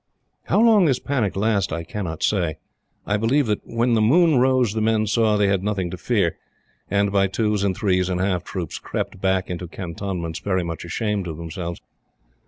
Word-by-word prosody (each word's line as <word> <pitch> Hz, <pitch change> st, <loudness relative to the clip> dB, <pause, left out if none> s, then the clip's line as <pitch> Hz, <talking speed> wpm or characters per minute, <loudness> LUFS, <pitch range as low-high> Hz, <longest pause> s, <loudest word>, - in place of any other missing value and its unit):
How -, -, +2 dB
long 220 Hz, -4 st, +6 dB
this 135 Hz, -5 st, +3 dB
panic 125 Hz, -9 st, -1 dB
lasted 100 Hz, -4 st, +1 dB
I 85 Hz, -, -4 dB
cannot 85 Hz, -2 st, -5 dB
say. 85 Hz, -7 st, +1 dB, 0.5 s
I 105 Hz, -, +1 dB
believe 125 Hz, +7 st, +2 dB
that 105 Hz, -2 st, -1 dB
when 115 Hz, +1 st, 0 dB
the 110 Hz, -, +3 dB
moon 155 Hz, +5 st, +4 dB
rose 130 Hz, -4 st, +3 dB
the 110 Hz, -, -1 dB
men 110 Hz, 0 st, +2 dB
saw 110 Hz, 0 st, +2 dB
they 105 Hz, -, +3 dB
had 100 Hz, -1 st, +1 dB
nothing 95 Hz, -4 st, -1 dB
to -, -, -4 dB
fear, 95 Hz, -3 st, 0 dB, 0.5 s
and, 100 Hz, 0 st, +1 dB
by 100 Hz, -1 st, +3 dB
twos 105 Hz, +1 st, 0 dB
and 95 Hz, -2 st, 0 dB
threes 95 Hz, -3 st, +1 dB
and 90 Hz, -1 st, -1 dB
half 90 Hz, -2 st, 0 dB
troops, 90 Hz, -4 st, -5 dB
crept 95 Hz, -, -4 dB
back 95 Hz, -1 st, +1 dB
into 90 Hz, 0 st, -5 dB
Cantonments 85 Hz, -1 st, -5 dB
very 95 Hz, -3 st, -1 dB
much 85 Hz, 0 st, -5 dB
ashamed 100 Hz, +2 st, -2 dB
of 80 Hz, -2 st, -5 dB
themselves. 85 Hz, +1 st, -5 dB
100 Hz, 190 wpm, -22 LUFS, 90-110 Hz, 0.5 s, long